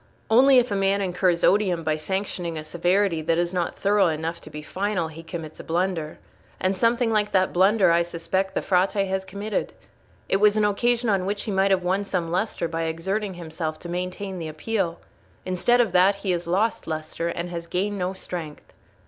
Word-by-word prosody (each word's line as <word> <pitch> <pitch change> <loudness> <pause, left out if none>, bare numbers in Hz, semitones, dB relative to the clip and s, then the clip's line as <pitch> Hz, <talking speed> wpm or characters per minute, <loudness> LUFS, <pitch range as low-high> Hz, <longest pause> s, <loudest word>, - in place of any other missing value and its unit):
Only 260 +3 +7
if 245 -2 +3
a - - +1
man 195 0 +2
incurs 180 -2 +1
odium 185 -4 +3
by 155 -1 +1
sanctioning 175 0 -3
a 155 - -5
severity 175 +2 +1
that 165 +1 +1
is 175 +1 0
not 175 -2 -2
thorough 200 -1 +3
enough 165 +1 -3
to - - -11
be 150 0 -8
final, 190 -1 -2
he 160 +1 -10
commits 165 -2 -8
a - - -7
blunder. 170 -2 -1 0.4
And 190 +1 +1
something 230 +3 +2
like 210 -1 +1
that 185 -1 +2
blunder, 190 +1 +4
I 170 0 +4
suspect, 185 +3 -2
the - - 0
Frate 185 0 +2
has 190 0 -1
committed. 200 +2 -3 0.5
It - - +2
was 210 +1 +4
an 210 - +3
occasion 240 +4 +1
on 195 -3 +1
which 205 0 -2
he 215 - -3
might 195 0 +2
have 190 -2 +2
won 190 +3 +1
some 180 -4 -2
lustre 185 -1 -1
by 165 0 -2
exerting 190 +5 -2
himself 160 -2 -5
to 175 - -8
maintain 180 +2 -4
the 165 - -4
Appeal; 170 +2 -2 0.5
instead 185 +7 +2
of 230 -5 +3
that, 185 +2 +5
he 200 -1 -2
has 175 -1 -2
lost 200 +6 0
lustre, 155 +1 -3
and 170 +1 -4
has 170 -1 -5
gained 200 +3 -1
no 180 +1 -1
strength." 170 -5 -8
185 Hz, 200 wpm, -24 LUFS, 170-200 Hz, 0.5 s, Only